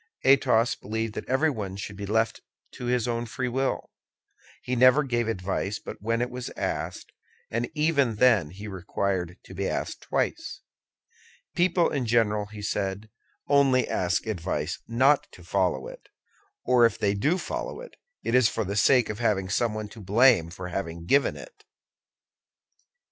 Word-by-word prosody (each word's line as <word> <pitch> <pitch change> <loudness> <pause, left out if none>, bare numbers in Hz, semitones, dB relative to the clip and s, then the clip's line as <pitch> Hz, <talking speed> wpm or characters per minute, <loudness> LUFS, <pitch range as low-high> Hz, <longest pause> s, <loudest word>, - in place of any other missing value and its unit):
Athos 125 -3 +4
believed 110 +1 -4
that - - -7
everyone 130 -9 0
should 100 +1 -6
be 100 0 -6
left 110 +2 0 0.3
to 125 - -8
his 125 -1 +1
own 120 0 -2
free 125 +3 -3
will. 130 +2 -2 0.7
He 125 - -2
never 130 +4 +6
gave 120 -3 -1
advice 100 0 -2
but - - -9
when 115 +3 0
it 125 - -4
was 125 0 -5
asked, - - -4 0.4
and 115 +1 -1
even 145 -6 +2
then 105 -9 +4
he 100 +6 -9
required 95 -2 -2
to - - -12
be 95 +1 -2
asked - - -3
twice. 325 -1 -2 0.9
"People, 175 -1 +2
in 135 -5 -1
general," 105 -3 +2
he 105 0 -9
said, 100 +1 -3 0.4
"only 135 -3 +4
ask 90 -2 0
advice 100 -7 -3
not 130 +5 +3
to - - -14
follow - - 0
it; - - -12 0.6
or 125 -1 +4
if 115 - -6
they 100 -1 +1
do 150 - +1
follow - - -5
it, - - -11 0.3
it - - -2
is 125 -3 +5
for 115 - -2
the 100 0 -4
sake 125 +3 +4
of 105 +1 -5
having 100 -5 0
someone 110 -1 -1
to 110 - -12
blame 105 -3 +4
for 90 +1 -7
having 85 -2 -5
given 140 +9 +2
it." 445 -4 -13
115 Hz, 160 wpm, -26 LUFS, 100-130 Hz, 0.9 s, never